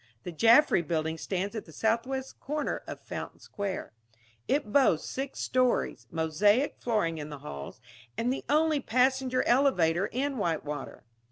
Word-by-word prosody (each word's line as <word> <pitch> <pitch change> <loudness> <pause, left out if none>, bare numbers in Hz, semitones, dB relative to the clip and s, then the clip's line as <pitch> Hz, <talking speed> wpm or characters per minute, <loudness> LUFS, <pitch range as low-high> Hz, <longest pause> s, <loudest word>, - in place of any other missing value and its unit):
The 180 - -5
Jaffry 230 - +5
Building 160 0 -2
stands 195 +5 -3
at 220 - -5
the 160 - -14
southwest 235 - -1
corner 300 +2 -3
of - - -6
Fountain - - -7
Square. 200 - -5 0.5
It 270 -7 0
boasts 260 - +4
six 270 +1 -5
stories, 250 - 0
mosaic 200 - +2
flooring 190 -9 0
in 150 0 -6
the 145 - -7
halls, 70 - -7 0.4
and 245 +2 +1
the - - -5
only 305 0 +3
passenger 255 0 +1
elevator 195 - +3
in 270 +3 -2
Whitewater. 150 -6 -3
220 Hz, 145 wpm, -29 LUFS, 165-265 Hz, 0.5 s, Jaffry